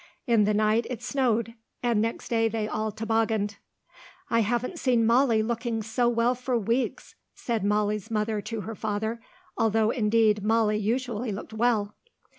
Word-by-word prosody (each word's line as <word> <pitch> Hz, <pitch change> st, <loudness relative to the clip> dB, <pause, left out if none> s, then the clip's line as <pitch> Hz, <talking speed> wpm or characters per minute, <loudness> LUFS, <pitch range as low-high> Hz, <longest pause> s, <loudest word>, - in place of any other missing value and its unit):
In 230 Hz, -5 st, +4 dB
the 210 Hz, -, +2 dB
night 215 Hz, +2 st, +2 dB
it 250 Hz, -4 st, -5 dB
snowed, 235 Hz, -4 st, 0 dB, 0.3 s
and 235 Hz, -3 st, +2 dB
next 230 Hz, +1 st, -3 dB
day 225 Hz, -1 st, +2 dB
they 220 Hz, -1 st, -2 dB
all 215 Hz, 0 st, -2 dB
tobogganed. 220 Hz, -2 st, -1 dB, 0.7 s
"I 230 Hz, -, +4 dB
haven't 240 Hz, -, -1 dB
seen 240 Hz, -3 st, +2 dB
Molly 230 Hz, -1 st, +4 dB
looking 230 Hz, 0 st, -2 dB
so 235 Hz, +3 st, +1 dB
well 235 Hz, +1 st, +2 dB
for 250 Hz, 0 st, -1 dB
weeks," 230 Hz, +4 st, -2 dB, 0.2 s
said 230 Hz, -4 st, -2 dB
Molly's 210 Hz, +1 st, 0 dB
mother 215 Hz, -1 st, -1 dB
to 220 Hz, +1 st, -5 dB
her 225 Hz, +3 st, -6 dB
father, 220 Hz, +2 st, -3 dB, 0.4 s
though 220 Hz, 0 st, +2 dB
indeed 215 Hz, -3 st, +2 dB
Molly 215 Hz, -1 st, +2 dB
usually 235 Hz, +1 st, -1 dB
looked 205 Hz, +2 st, -7 dB
well. 220 Hz, -2 st, +1 dB
225 Hz, 155 wpm, -27 LUFS, 215-235 Hz, 0.7 s, In